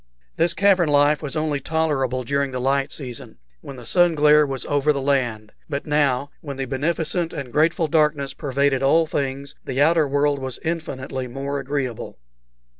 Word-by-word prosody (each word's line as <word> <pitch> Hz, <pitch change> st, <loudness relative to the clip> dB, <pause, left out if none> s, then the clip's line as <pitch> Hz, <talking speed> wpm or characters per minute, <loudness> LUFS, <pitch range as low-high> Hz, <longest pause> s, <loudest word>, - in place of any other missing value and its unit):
This 170 Hz, 0 st, +2 dB
cavern 190 Hz, -5 st, +3 dB
life 145 Hz, +1 st, +3 dB
was 150 Hz, 0 st, -4 dB
only 155 Hz, -2 st, -1 dB
tolerable 135 Hz, -4 st, -1 dB
during 140 Hz, +3 st, 0 dB
the 130 Hz, -1 st, -4 dB
light 135 Hz, +2 st, 0 dB
season, 125 Hz, -, -7 dB, 0.2 s
when 135 Hz, -, -9 dB
the 125 Hz, -2 st, -11 dB
sun 175 Hz, +4 st, +3 dB
glare 150 Hz, 0 st, +5 dB
was 135 Hz, -2 st, -4 dB
over 145 Hz, +1 st, +2 dB
the 140 Hz, -, -1 dB
land; 120 Hz, -6 st, -1 dB, 0.2 s
but 140 Hz, -1 st, -3 dB
now, 145 Hz, -2 st, +1 dB
when 140 Hz, -3 st, -7 dB
the 135 Hz, -, -2 dB
beneficent 160 Hz, +5 st, -1 dB
and 130 Hz, -4 st, -6 dB
grateful 160 Hz, +1 st, +2 dB
darkness 150 Hz, -3 st, +1 dB
pervaded 140 Hz, -1 st, 0 dB
all 160 Hz, +5 st, +4 dB
things, 140 Hz, -1 st, -3 dB
the 130 Hz, 0 st, -4 dB
outer 160 Hz, +1 st, +4 dB
world 145 Hz, 0 st, +1 dB
was 130 Hz, -2 st, -4 dB
infinitely 135 Hz, -6 st, -4 dB
more 140 Hz, +3 st, -4 dB
agreeable. 135 Hz, -4 st, -4 dB
140 Hz, 170 wpm, -22 LUFS, 135-155 Hz, 0.2 s, glare